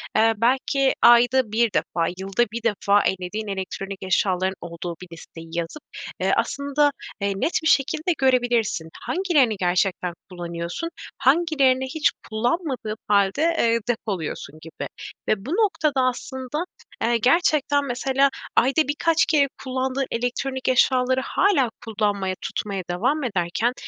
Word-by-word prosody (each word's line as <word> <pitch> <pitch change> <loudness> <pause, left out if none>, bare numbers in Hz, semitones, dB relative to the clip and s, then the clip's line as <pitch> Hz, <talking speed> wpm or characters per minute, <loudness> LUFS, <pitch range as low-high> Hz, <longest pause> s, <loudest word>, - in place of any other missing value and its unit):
eee, 225 +1 +4
belki 265 +3 +2
ayda 240 0 +5
1 225 -1 +2
defa, 165 -2 0
yılda 195 +5 0
1 230 +1 -5
defa 205 -2 +2
ellediğin 190 +4 -2
elektronik 195 0 -5
eşyaların 190 0 +1
olduğu 170 0 -6
bir 185 - -9
listeyi 165 0 -12
yazıp, 170 - -4 0.4
eee, - - +1
aslında, 285 +1 +1 0.3
eee, 200 0 0
net 310 - -1
bir - - +1
şekilde 305 +5 +2
görebilirsin. 245 -10 +1
"Hangilerini 310 - +2
gerçekten 180 0 0 0.2
kullanıyorsun, 175 - -5 0.3
hangilerini 275 -2 +3
hiç 300 +4 +1 0.2
kullanmadığın 240 0 -2
hâlde, 200 +4 +2 0.2
eee, 230 0 +3
depoluyorsun?" 185 -9 -4
gibi. 165 +1 -7 0.4
Ve 205 -1 0
bu - - -6
noktada 330 -9 +1
aslında, 260 +3 -2 0.4
eee, 235 +1 +2
gerçekten, 285 +2 +2
mesela, 270 +2 +1 0.3
ayda 275 +4 +3
birkaç 325 +3 +2
kere 290 -3 +3 0.2
kullandığın 260 +1 -1
elektronik 260 +3 -2
eşyaları 255 0 +3
hâlâ 310 - +2 0.2
kullanmaya, 205 -4 -1
tutmaya 195 -3 -3
devam 255 +13 0
ederken 205 +2 0
240 Hz, 125 wpm, -23 LUFS, 195-275 Hz, 0.4 s, ayda